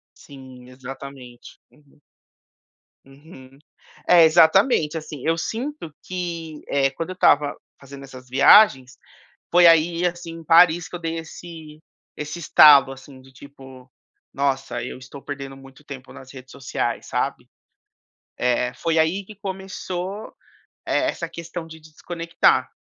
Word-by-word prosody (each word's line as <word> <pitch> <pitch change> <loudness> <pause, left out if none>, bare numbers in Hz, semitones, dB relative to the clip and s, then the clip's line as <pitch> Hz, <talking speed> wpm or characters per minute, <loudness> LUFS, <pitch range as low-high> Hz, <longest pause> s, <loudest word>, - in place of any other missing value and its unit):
Sim, 130 -3 -14
exatamente. 130 -1 -11
Uhum. 145 -1 -27 1.0
Uhum. 135 -1 -17 0.5
É, 175 -2 +7
exatamente. 160 - +3
Assim, 150 -3 -9
eu 165 - +1
sinto 235 - -5
que, 170 -4 -6
eh, 135 -1 +1
quando 165 +6 -6
eu - - -6
estava 145 -5 +2 0.2
fazendo 140 0 -12
essas 130 -1 -13
viagens, 135 - +5 0.5
foi 175 0 +6
aí 165 +2 +4
assim, 175 -1 -5
em 165 -1 -11
Paris 165 +1 +4
que 175 - -7
eu - - -10
dei 165 -1 -4
esse 160 -1 -11 0.4
esse 150 +3 -6
estalo 145 -4 +6
assim, 130 0 -14
de 135 0 -19
tipo: 130 -1 -15 0.4
"Nossa 135 -3 -2
eu 125 - -8
estou 130 +2 -12
perdendo 135 -1 -8
muito 135 +1 -16
tempo 135 -2 -11
nas 130 +1 -13
redes 130 -1 -13
sociais", 135 - -4
sabe. - - -3 0.9
É, 125 0 0
foi 165 -1 -1
aí 175 +5 0
que 215 +2 -14
começou 190 0 -6 0.5
e - - -6
essa 315 - -1
questão 170 0 -8
de 160 0 -12
desconectar, 165 +2 -1
150 Hz, 135 wpm, -22 LUFS, 135-170 Hz, 1.0 s, É